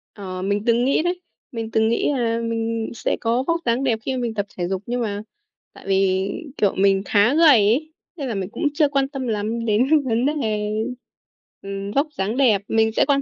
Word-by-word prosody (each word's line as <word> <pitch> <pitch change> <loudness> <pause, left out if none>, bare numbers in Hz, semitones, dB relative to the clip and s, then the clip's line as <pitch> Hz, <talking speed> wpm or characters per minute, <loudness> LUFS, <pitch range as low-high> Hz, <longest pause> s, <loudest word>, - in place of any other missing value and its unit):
Ờ, 185 -3 -6
mình 200 +2 -1
từng 235 +1 +3
nghĩ 275 - +2
đấy. 355 +1 -2 0.3
Mình 225 -3 -5
từng 220 0 +2
nghĩ 235 - +1
là 230 -3 0
mình 230 -1 -2
sẽ - - -2
có 235 +3 +1
vóc 335 0 +1
dáng 240 +2 +1
đẹp 235 -5 +1
khi 265 - -1
mà - - -3
mình 235 -2 -2
tập 205 -2 -2
thể 175 -1 -1
dục, 190 0 -2
nhưng 245 +1 -2
mà 205 -2 -2 0.5
tại - - -15
vì, 190 0 +2 0.3
kiểu, 200 -2 +2
mình 195 0 +3
khá 205 +6 +3
gầy 330 +1 +6
ấy, 255 +6 +3 0.2
nên 280 -4 -4
là 225 - -3
mình 190 -1 -3
cũng - - -1
chưa 295 -1 +3
quan 275 -1 +1
tâm 270 -3 -5
lắm 220 +1 -2
đến 260 +8 +3
vấn 235 0 +1
đề, 220 -8 -1 0.9
ừm, 195 0 -5
vóc 280 +7 +1
dáng 205 +5 -1
đẹp. 230 -8 +4
Mình 220 0 +2
sẽ - - +2
quan 280 -1 +3
230 Hz, 220 wpm, -22 LUFS, 205-265 Hz, 0.9 s, gầy